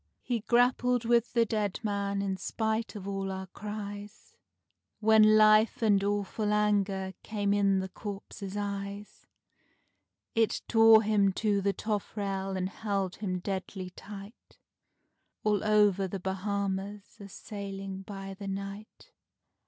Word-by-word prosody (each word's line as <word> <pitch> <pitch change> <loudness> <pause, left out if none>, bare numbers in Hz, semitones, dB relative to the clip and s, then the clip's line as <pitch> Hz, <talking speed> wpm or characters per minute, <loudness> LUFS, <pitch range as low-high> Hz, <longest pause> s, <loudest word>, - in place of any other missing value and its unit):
He 240 -2 -1
grappled 245 +1 +2
with 235 0 +2
the 235 -1 +4
dead 210 -3 -1
man 200 -1 -1
in 195 -1 -1
spite 220 +4 -2
of 200 -2 -7
all 195 -1 -2
our 190 0 -5
cries, 205 +1 -8 0.7
When 215 0 +6
life 215 +2 +5
and 205 -3 +4
awful 205 +1 -1
anger 200 -2 +1
came 205 -2 -1
in 200 -1 +3
the 190 - -4
corpse's 200 0 -7
eyes; 200 0 -5 1.1
It 225 -1 +1
tore 225 -1 +7
him 205 -2 +3
to 205 0 +1
the 200 0 +1
toffrail 195 -2 -3
and 185 0 -1
held 195 -3 -2
him 185 -3 -2
deadly 190 -1 -4
tight, 200 +4 -12 0.9
All 210 -1 +1
over 205 -3 +3
the 195 +1 -5
Bahama 190 +1 -2
Isles 205 -1 -17
a 200 -1 -10
sailing 195 -1 -7
by 195 0 -7
the 195 +1 -8
night. 195 +2 -7
200 Hz, 130 wpm, -30 LUFS, 195-215 Hz, 1.1 s, tore